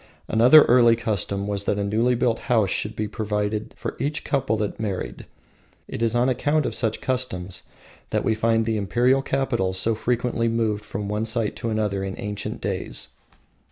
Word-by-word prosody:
Another 125 +7 +7
early 120 -1 +5
custom 100 -3 -2
was 100 -1 -2
that 100 - 0
a 100 - 0
newly 115 +5 +1
built 120 -1 +1
house 110 -6 +3
should 105 +1 -2
be 105 0 -2
provided 105 -1 -3
for - - -5
each 145 +4 -2
couple 120 -6 0
that 105 -1 -3
married. 100 -4 -4 0.6
It - - -6
is 115 0 +1
on 120 +1 +3
account 145 +4 +1
of - - -2
such 110 -3 -1
customs 100 -9 -2 0.5
that - - 0
we 110 - +3
find 115 0 +1
the 110 -1 0
Imperial 120 +7 +2
capitals 120 -9 0
so 115 +5 +2
frequently 120 +1 0
removed 110 -2 0
from 105 -1 -5
one 105 +2 -1
site 115 -1 -1
to 115 - -3
another 105 -3 -1
in 95 0 -4
ancient 105 0 -5
days. - - -3
110 Hz, 180 wpm, -24 LUFS, 105-120 Hz, 0.6 s, Another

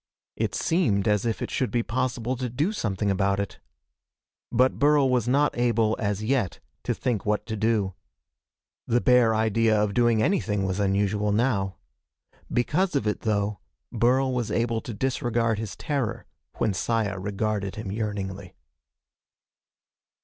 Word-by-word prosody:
It - - -2
seemed 115 - +1
as 105 +1 +2
if 115 - -2
it - - -5
should 130 - 0
be 120 -1 0
possible 125 0 -1
to 125 0 -3
do 145 - 0
something 100 - -1
about 100 0 +1
it. 100 - -4 0.9
But 125 +2 +2
Burl 145 -1 +4
was 120 -2 +1
not 145 +4 +2
able, 115 -2 +2
as 105 -1 -1
yet, 115 -6 0 0.3
to - - 0
think 115 -6 -1
what 105 0 0
to 110 - -4
do. 110 -3 +1 0.9
The 120 - +3
bare 120 -3 +4
idea 110 0 +2
of 105 -1 +1
doing 120 -2 +3
anything 105 - +1
was 95 +1 -2
unusual, 100 +1 +1
now. 100 -4 +1 0.8
Because 165 +8 +1
of 135 - +1
it, 105 - 0
though, 105 -2 -1 0.3
Burl 130 +2 +2
was 120 -3 -1
able 115 -1 0
to 120 - -7
disregard 120 -2 0
his 110 -4 -5
terror 140 -7 -2 0.3
when 105 - +1
Saya 100 0 -1
regarded 100 0 -2
him 105 -3 -5
yearningly. 100 -3 -4
110 Hz, 150 wpm, -26 LUFS, 100-125 Hz, 0.9 s, Burl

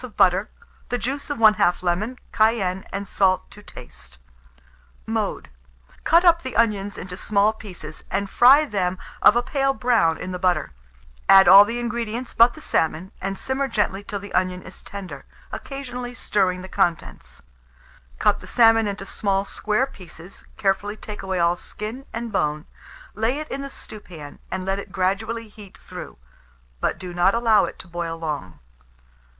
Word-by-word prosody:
of 245 -4 -10
butter, 190 +3 +3 0.4
the 245 - 0
juice 270 +5 -4
of 290 - -2
1/2 210 -5 +4
lemon, 200 +8 -1
cayenne 200 -4 +1
and 200 0 -4
salt 185 -2 +1
to 210 - -13
taste. 65 - -11 0.9
Mode. - - -3 0.5
Cut 340 +2 +4
up 335 -1 +6
the 260 - -6
onions 205 -3 +1
into 180 0 -7
small 210 +2 +2
pieces, 175 -8 -10
and 200 +2 -1
fry 265 +9 +6
them 185 -7 -1 0.2
of 210 - +7
a 240 - +2
pale 275 +1 0
brown 225 -12 +2
in 185 - -6
the 180 - -4
butter; 180 - 0 0.6
add 195 -1 +8
all 195 +3 +10
the 230 +3 -3
ingredients 240 0 -3
but 235 +1 +5
the - - -11
salmon, 160 +4 -1
and 195 0 -3
simmer 265 +4 -1
gently 205 -4 -1
till 205 0 -5
the 200 +1 -9
onion 185 0 0
is - - -11
tender, 185 -9 -8 0.3
occasionally 250 -3 -6
stirring 185 -5 0
the - - -7
contents; 170 -3 -2 0.7
cut - - +2
the - - -12
salmon 225 -2 +5
into 200 -1 -4
small 195 -1 -1
square 215 +5 0
pieces, 185 - -11
carefully 200 +1 0
take 210 -1 -8
away 190 -1 -3
all 170 0 +3
skin 220 +9 -7
and 230 0 -5
bone, 150 -5 -1 0.5
lay 225 +6 0
it 305 0 -5
in 275 - -3
the 275 - -6
stewpan, 175 - -10
and 185 0 -4
let 195 +1 -1
it 200 - -9
gradually 200 +5 -1
heat 205 -2 -14
through; - - -10 0.6
but - - -1
do 180 -1 -8
not 180 +4 +3
allow 225 -3 +4
it - - -8
to - - -9
boil 170 -1 -4
long. 150 - -5
200 Hz, 165 wpm, -23 LUFS, 185-230 Hz, 0.9 s, all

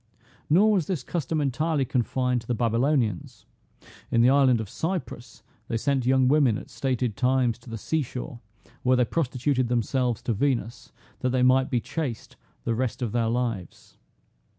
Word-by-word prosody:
Nor 200 +8 +5
was 185 -7 +1
this 170 -9 -2
custom 160 0 -2
entirely 145 +1 0
confined 125 0 0
to 115 - -17
the 125 - 0
Babylonians; 115 - 0 0.6
in 115 - +3
the 125 - +6
island 135 -4 +4
of 110 - -4
Cyprus 130 - -5 0.2
they 115 - -1
sent 130 +1 0
young 130 0 +4
women 135 -6 +3
at - - -10
stated 125 -5 -1
times 125 -2 +1
to 120 - -14
the 115 - -5
sea 160 +9 -1
shore, 125 0 -6 0.4
where 130 0 +3
they 125 - +3
prostituted 130 -2 0
themselves 120 0 0
to 120 - 0
Venus, 120 0 -2 0.3
that 130 - 0
they 125 0 +1
might 130 +1 +4
be 125 - +1
chaste 130 -2 -5 0.3
the 115 - 0
rest 125 +1 -2
of 115 - -2
their 115 0 0
lives. 115 -7 -4
125 Hz, 170 wpm, -26 LUFS, 120-140 Hz, 0.6 s, the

